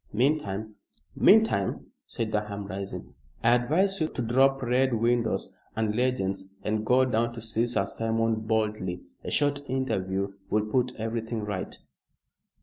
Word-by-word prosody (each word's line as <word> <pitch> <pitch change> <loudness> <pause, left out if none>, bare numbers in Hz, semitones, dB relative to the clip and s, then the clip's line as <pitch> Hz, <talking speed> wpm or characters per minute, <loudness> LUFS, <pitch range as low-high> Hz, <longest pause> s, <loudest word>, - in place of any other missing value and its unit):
Meantime 110 -5 0 0.2
" - - -36
"Meantime," 210 - +4 0.2
said 115 -2 -3
Durham, 105 -1 -2
rising, 100 0 -6 0.3
"I 115 +1 +6
advise 165 +11 +2
you 155 - +2
to 135 - -4
drop 135 +3 +3
red 125 +1 +2
windows 115 0 +1 0.2
and 110 -1 0
legends 100 -6 0 0.2
and 110 0 0
go 125 +3 +4
down 120 -1 0
to 120 - -7
see 115 +1 0
Sir 120 -5 0
Simon 115 +1 0
boldly. 105 -5 -1 0.2
A - - -4
short 145 -1 +1
interview 100 -7 -1 0.2
will 105 0 +1
put 125 +3 0
everything 115 0 -3
right." 100 -3 -4
115 Hz, 145 wpm, -27 LUFS, 105-125 Hz, 0.3 s, I